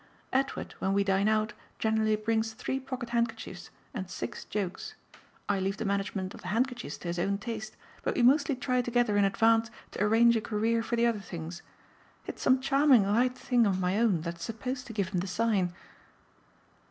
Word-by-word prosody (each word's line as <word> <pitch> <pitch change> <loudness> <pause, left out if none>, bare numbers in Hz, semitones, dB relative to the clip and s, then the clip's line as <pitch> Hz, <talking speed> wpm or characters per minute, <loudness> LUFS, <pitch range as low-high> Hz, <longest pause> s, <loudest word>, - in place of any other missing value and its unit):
Edward, 270 +1 -1
when 190 - 0
we 200 0 +3
dine 195 +1 +2
out, 215 0 +1 0.2
generally 220 -1 +2
brings 220 +1 0
three 255 +3 -3
pocket 260 -3 -6
handkerchiefs 235 -1 -2 0.2
and 190 -7 -5
six 190 - -6
jokes. 195 -3 -4 0.5
I 200 - +1
leave 195 +1 -1
the 225 - -3
management 195 -1 -2
of - - -11
the - - -8
handkerchiefs 240 +4 -1
to 175 - -6
his 170 0 -2
own 200 +3 +1
taste, 220 0 -6 0.2
but - - -1
we 245 - +2
mostly 280 +2 +4
try 250 0 0
together 240 -3 +1
in 205 -1 +4
advance 225 +3 +3 0.2
to - - -5
arrange 230 +3 +5
a 225 - +1
career 225 +1 0
for 235 - -2
the 235 0 +3
other 230 -3 +1
things. 170 -2 -7 0.6
It's - - -7
some 260 0 +4
charming 275 -5 +5
light 245 +5 +2
thing 240 -3 +2
of 190 -2 0
my 185 +3 +1
own 210 -8 +3
that's 170 0 -5
supposed 250 +3 -4
to 230 - -7
give 200 -4 -1
him 185 - -1
the 185 - -3
sign." 195 -3 +1
220 Hz, 190 wpm, -29 LUFS, 195-240 Hz, 0.6 s, arrange